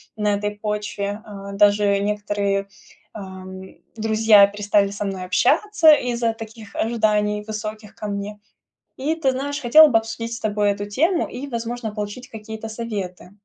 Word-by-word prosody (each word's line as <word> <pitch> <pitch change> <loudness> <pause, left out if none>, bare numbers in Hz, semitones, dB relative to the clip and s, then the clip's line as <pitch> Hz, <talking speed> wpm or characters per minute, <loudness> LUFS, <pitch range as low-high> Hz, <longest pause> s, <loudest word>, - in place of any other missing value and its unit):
на 210 -1 +1
этой 205 0 -2
почве. 210 0 -3
А, 200 -1 -9
даже 205 0 +3
некоторые, 200 -1 -1 0.5
ам, 190 -2 -9
и 190 - -16 0.2
друзья 220 -2 +5
перестали 205 0 +1
со 205 +1 -4
мной 190 -2 -4
общаться 325 - +4
из-за 240 -4 0
таких 220 -2 -11
ожиданий 210 -2 +1
высоких 215 -1 -6
ко 210 - -6
мне. 205 +1 -5 0.6
И 290 +5 -1
ты 315 -5 +1
знаешь, 285 +3 -3
хотела 305 +6 +8
бы 245 -7 +4
обсудить 230 +1 -5
с 230 - -7
тобой 210 -1 +1
эту 200 0 -3
тему 330 - +1
и, 265 +3 -6
возможно, 235 -3 -4
получить 210 +4 -6
какие-то 220 0 -8
советы. 205 -6 -6
210 Hz, 150 wpm, -22 LUFS, 205-230 Hz, 0.6 s, хотела